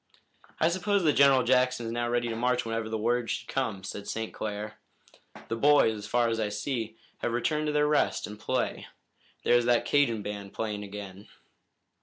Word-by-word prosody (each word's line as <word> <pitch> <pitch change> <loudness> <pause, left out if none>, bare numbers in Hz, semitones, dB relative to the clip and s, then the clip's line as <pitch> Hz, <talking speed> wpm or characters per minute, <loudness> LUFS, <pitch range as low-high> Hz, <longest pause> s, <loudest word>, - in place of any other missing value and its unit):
"I 160 - +4
suppose 185 +2 +1
that 155 -3 +4
General 135 -2 +5
Jackson 125 -1 +2
is 115 - -3
now 120 0 -1
ready 120 0 0
to 115 - -3
march 125 +1 0
whenever 115 -1 -2
the 110 - -2
word 120 +2 0
should - - -3
come," 110 -8 -2
said 100 +1 -7
St. 110 0 -4
Clair. 105 0 -5 0.7
"The - - -2
boys, 140 -3 +4
as 105 0 -7
far 120 +1 +2
as 115 0 -1
I 110 - +1
can 105 - -4
see, 115 -2 -3 0.2
have 115 - -2
returned 150 +5 0
to - - +1
their 150 0 +2
rest 150 0 +1
and 105 0 -9
play. - - -2 0.6
There's 120 0 +4
that 120 -1 +3
Cajun 120 -7 +2
band 100 -1 -6
playing 105 -2 -3
again." 100 -1 -9
115 Hz, 195 wpm, -28 LUFS, 105-130 Hz, 0.7 s, General